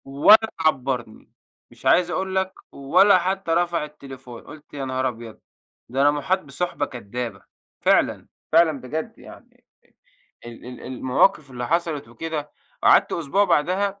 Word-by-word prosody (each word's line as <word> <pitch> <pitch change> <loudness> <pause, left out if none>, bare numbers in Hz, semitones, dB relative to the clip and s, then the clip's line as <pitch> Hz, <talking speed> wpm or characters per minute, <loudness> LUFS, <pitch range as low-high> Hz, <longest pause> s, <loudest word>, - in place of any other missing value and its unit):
ولا 205 +11 +5
عبّرني. 130 -7 -2 0.4
مش - - -18
عايز 180 -1 +4
أقول 190 +1 -3
لك 190 0 0 0.2
ولا 140 +9 +4
حتّى 190 -2 -2
رفع 170 -1 +1
التليفون، 135 -5 -12
قُلت 150 +1 -14
يا 140 -2 -4
نهار 130 0 -1
أبيض، 115 -2 -8 0.5
ده 130 +3 -1
أنا 145 +1 +5
مُحاط 150 +6 0
بِصُحبة 150 0 -3
كدّابة 120 -1 -7 0.4
فعلًا، - - +2 0.2
فعلًا 160 -4 +3
بجد 160 - -5
يعني - - -16 0.8
ال 120 -1 -11
ال 125 0 -9
المواقِف 130 +4 +1
اللي 125 -1 -5
حصلت 165 -7 -1
وكده، 150 +4 -5 0.3
قعدت - - +5
أسبوع 170 +5 +1
بعدها 195 +4 0
150 Hz, 135 wpm, -23 LUFS, 130-175 Hz, 0.8 s, ولا